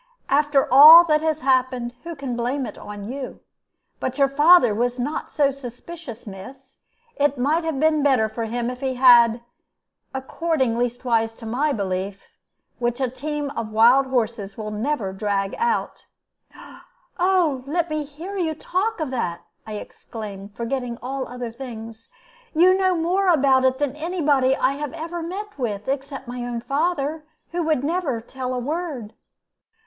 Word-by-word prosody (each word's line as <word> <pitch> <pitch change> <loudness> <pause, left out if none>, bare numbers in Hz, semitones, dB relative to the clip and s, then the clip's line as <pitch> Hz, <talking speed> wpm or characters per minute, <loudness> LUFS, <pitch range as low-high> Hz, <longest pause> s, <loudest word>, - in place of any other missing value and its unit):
"After 290 0 +3
all 310 +5 +11
that 305 -2 +2
has 315 -1 -1
happened, 255 -2 +1
who 340 0 -6
can 275 -4 -4
blame 250 +3 -1
it - - -7
on 205 -1 -9
you? 260 +2 -6 0.6
But 260 +1 -3
your 275 -1 +4
father 295 -4 +6
was 245 +3 -1
not 275 +5 -3
so 285 -2 +2
suspicious, 265 0 -9
miss. 260 +7 -11 0.4
It 285 -1 +1
might 300 +7 +1
have 320 -4 -2
been 310 0 +3
better 265 -6 +3
for 225 +1 -4
him 240 +2 -2
if 250 - -9
he 265 -1 -2
had 240 -2 +6 0.7
according, 265 -1 -1
leastways, 235 -2 0
to 230 - -11
my 265 +7 0
belief, 195 -3 -3 0.6
which 240 +1 -1
a 260 -3 -1
team 290 +2 -4
of 220 -5 -5
wild 240 +5 +5
horses 230 -6 -2
will 215 -1 -5
never 210 -2 -2
drag 195 0 -1
out." 470 0 -1 0.5
"Oh, - - -14 0.4
only 330 -8 +1
let 345 +1 +1
me 305 -1 -1
hear 315 +8 -9
you 330 -5 -1
talk 375 +8 -2
of 305 -4 -3
that!" 175 -9 -2 0.3
I 215 - -6
exclaimed, 205 -1 -8
forgetting 240 0 -3
all 265 +1 -3
other 245 -1 -6
things. 230 -2 -9 0.5
"You 365 +3 +6
know 375 -1 +2
more 360 +4 +1
about 275 -6 +4
it 260 0 +2
than 285 -1 -1
any 340 +4 -4
body 270 -4 +3
I 260 -1 +1
have 290 +1 -5
ever 335 +1 -5
met 390 +2 -6
with, 210 -5 -3
except 275 -1 -4
my 245 0 -5
own 240 -1 -4
father, 305 +2 -1 0.3
who 345 +1 -1
would 310 -5 0
never 310 -6 -1
tell 255 +2 -5
a - - -2
word." 280 -4 -4
265 Hz, 165 wpm, -23 LUFS, 235-305 Hz, 0.7 s, all